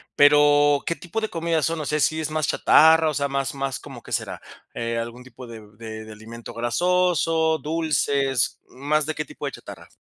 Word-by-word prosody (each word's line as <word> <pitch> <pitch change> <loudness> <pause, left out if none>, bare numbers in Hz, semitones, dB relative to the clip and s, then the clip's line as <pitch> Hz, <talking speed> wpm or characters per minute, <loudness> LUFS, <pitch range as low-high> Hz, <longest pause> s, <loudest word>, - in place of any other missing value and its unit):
Pero, 145 0 +5
¿qué 170 - 0
tipo 180 +7 -5
de 220 - -2
comidas 165 -2 -1
son? 165 -1 -2
O - - -5
sea, 150 +2 -1
si 155 +1 +1
es 155 -1 -3
más 155 -2 -1
chatarra, 160 0 +5
o - - -3
sea, 140 0 -1
más 135 -1 -2
más. 135 -2 -3
¿Cómo - - -11
qué - - -14
será? - - -3 0.3
Eh, 115 0 -3
algún 120 +2 -6
tipo 125 0 -12
de 115 -2 -10
b 105 0 -18
de 110 -1 -8
de 110 - -11
alimento 115 +2 -11
grasoso, 160 +5 +1
dulces, 145 -5 0
¿más 145 +3 -1
de 155 - -3
qué 155 0 -4
tipo - - -9
de - - -3
chatarra? - - -11
145 Hz, 210 wpm, -23 LUFS, 120-160 Hz, 0.3 s, Pero